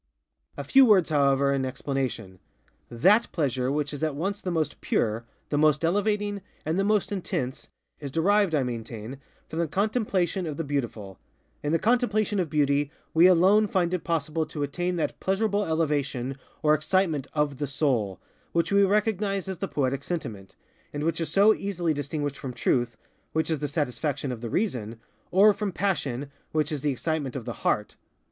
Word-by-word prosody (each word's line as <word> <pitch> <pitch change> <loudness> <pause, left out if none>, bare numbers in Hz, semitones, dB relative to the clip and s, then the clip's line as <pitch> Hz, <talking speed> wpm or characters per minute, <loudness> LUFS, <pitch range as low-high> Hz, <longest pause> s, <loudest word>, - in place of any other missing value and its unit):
A - - -3
few 270 0 +6
words, 195 -10 +5
however, 140 -1 +3
in 135 -1 0
explanation. 130 -7 -3 0.5
_That 195 - +4
_pleasure 130 -4 -1
which 145 0 -1
is 145 - -6
at 155 -3 0
once 195 +7 -2
the 185 - -3
most 160 -4 -2
pure, 110 +1 0 0.2
the 145 - +1
most 155 +1 +3
elevating, 205 +2 0 0.2
and 160 +4 0
the - - +2
most 210 0 +1
intense, 135 -9 -3 0.3
is 145 - -5
derived, 190 +4 +2
I 140 - +2
maintain, 115 +1 -6 0.3
from 160 - -5
the 170 - +1
contemplation 195 - 0
of 150 -2 -4
the 165 - -2
Beautiful. 115 - -4 0.4
In 145 - -1
the 165 - +4
contemplation 215 -1 +1
of 175 -4 -1
Beauty 145 -1 +2 0.2
we 165 +3 +7
alone 190 +4 +5
find 180 -3 0
it 180 - -1
possible 160 -1 -1
to 150 - -4
attain 175 +5 -2
that 165 - -2
pleasurable 205 +1 0
elevation, 145 -5 -1 0.3
or 150 0 +5
excitement 155 -2 +1
_of 150 -3 0
the 145 - -1
soul, 125 - 0 0.4
_which 170 +3 +1
we 200 0 +5
recognize 200 -1 +1
as 190 -2 -5
the 195 - -2
Poetic 140 -3 -1
Sentiment, 115 - -5 0.4
and 145 0 -4
which 165 +1 0
is 165 - -1
so 205 +2 +5
easily 180 -6 -1
distinguished 145 0 -3
from 130 -2 -5
Truth, 120 -1 0 0.4
which 160 +1 0
is 155 - 0
the 145 - -2
satisfaction 145 -1 -2
of 120 -2 -6
the 120 - -4
Reason, 115 - -2 0.3
or 205 +3 +6
from 205 -1 -3
Passion, 145 -9 -2 0.2
which 155 0 +1
is 150 -3 -2
the 150 - +1
excitement 145 -1 -2
of 125 -4 -5
the 120 - -4
heart. 105 0 0
155 Hz, 180 wpm, -26 LUFS, 135-190 Hz, 0.5 s, we